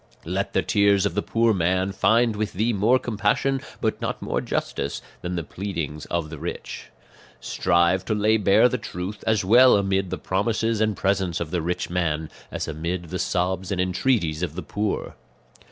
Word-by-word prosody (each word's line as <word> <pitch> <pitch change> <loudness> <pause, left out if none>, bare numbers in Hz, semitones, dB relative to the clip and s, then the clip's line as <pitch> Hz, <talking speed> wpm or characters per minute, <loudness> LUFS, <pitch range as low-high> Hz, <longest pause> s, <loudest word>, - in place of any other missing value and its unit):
"Let - - -2
the - - +2
tears 100 -1 +3
of 100 - 0
the 105 - 0
poor 115 +1 +2
man 95 +1 +1
find 115 +3 +3
with 105 0 -2
thee 110 +5 +1
more 110 +5 +4
compassion, 120 +4 0 0.2
but - - -1
not - - -2
more - - -2
justice, - - -3 0.2
than 90 0 -3
the 85 - -2
pleadings 85 -6 -5
of 85 -3 -2
the 80 - -7
rich. 85 +3 -6 0.5
"Strive 85 +8 +2
to 110 - 0
lay 105 +1 +3
bare 100 +3 +5
the 125 0 -2
truth, 95 +1 -6
as 110 -4 +2
well 125 +5 +7
amid 95 -1 0
the - - -3
promises 110 +3 0
and 110 -2 +1
presents 95 -3 0
of 80 -2 -4
the 90 -2 0
rich 90 +2 -2
man, 80 -3 -1 0.2
as - - -3
amid 85 +2 -4
the 90 - -3
sobs 90 +1 -1
and 95 - -1
entreaties 90 -3 +1
of 85 -3 -3
the 90 - -5
poor. 105 +5 -2
95 Hz, 185 wpm, -24 LUFS, 85-105 Hz, 0.5 s, well